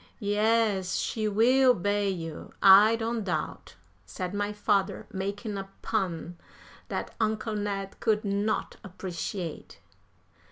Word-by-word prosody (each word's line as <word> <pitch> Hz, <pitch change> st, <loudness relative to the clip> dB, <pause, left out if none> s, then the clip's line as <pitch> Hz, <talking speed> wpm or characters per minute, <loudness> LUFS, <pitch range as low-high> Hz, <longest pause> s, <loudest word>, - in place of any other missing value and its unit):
"Yes, 210 Hz, -2 st, +1 dB
she 215 Hz, -2 st, -1 dB
will 250 Hz, +5 st, +4 dB
bay 205 Hz, +1 st, 0 dB
you, 165 Hz, -4 st, -6 dB
I 200 Hz, +3 st, +8 dB
don't 230 Hz, 0 st, -2 dB
doubt," 185 Hz, -, -4 dB, 0.3 s
said 185 Hz, -1 st, -5 dB
my 205 Hz, 0 st, -1 dB
father, 200 Hz, -2 st, 0 dB
making 200 Hz, +2 st, -3 dB
a 195 Hz, 0 st, -7 dB
pun 175 Hz, -5 st, -2 dB, 0.5 s
that -, -, -4 dB
Uncle 220 Hz, 0 st, 0 dB
Ned 200 Hz, -2 st, -3 dB
could 215 Hz, -1 st, +1 dB
not 205 Hz, +2 st, -1 dB
appreciate. 180 Hz, -2 st, -6 dB
205 Hz, 115 wpm, -28 LUFS, 190-220 Hz, 0.5 s, I